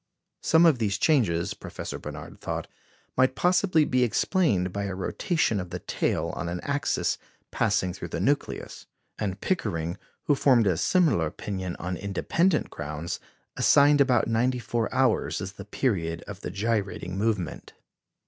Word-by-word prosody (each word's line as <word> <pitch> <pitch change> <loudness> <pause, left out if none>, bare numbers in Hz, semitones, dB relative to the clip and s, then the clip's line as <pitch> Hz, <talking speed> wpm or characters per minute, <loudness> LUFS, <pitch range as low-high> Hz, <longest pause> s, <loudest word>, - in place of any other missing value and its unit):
Some 165 +1 +5
of 155 -7 +5
these 105 -3 0
changes, 100 - +2
Professor - - -7
Barnard - - -9
thought, - - -3 0.5
might 130 0 +3
possibly 180 -2 +3
be 125 -2 +2
explained 110 - +1
by 100 0 -2
a 100 -1 -3
rotation 115 - 0
of 90 -1 -5
the 90 - -4
tail - - -1
on 85 - -3
an 90 +1 -3
axis 140 0 0 0.3
passing 90 -1 +1
through - - -6
the - - -4
nucleus, - - -2 0.3
and 100 -2 -2
Pickering, 85 - -1 0.2
who 145 - +3
formed 130 -5 +4
a 95 -3 +3
similar 140 - +3
opinion 95 +2 -5
on 90 +1 -4
independent 155 - 0
grounds, 75 +2 -5 0.4
assigned 145 0 +5
about 125 -4 +3
94 115 0 0
hours 130 -4 +1
as 95 -1 -5
the 100 -1 -10
period 90 -8 -1
of 100 -2 -7
the - - -4
gyrating 100 -4 -2
movement. 100 -4 -2
105 Hz, 150 wpm, -27 LUFS, 90-135 Hz, 0.5 s, Some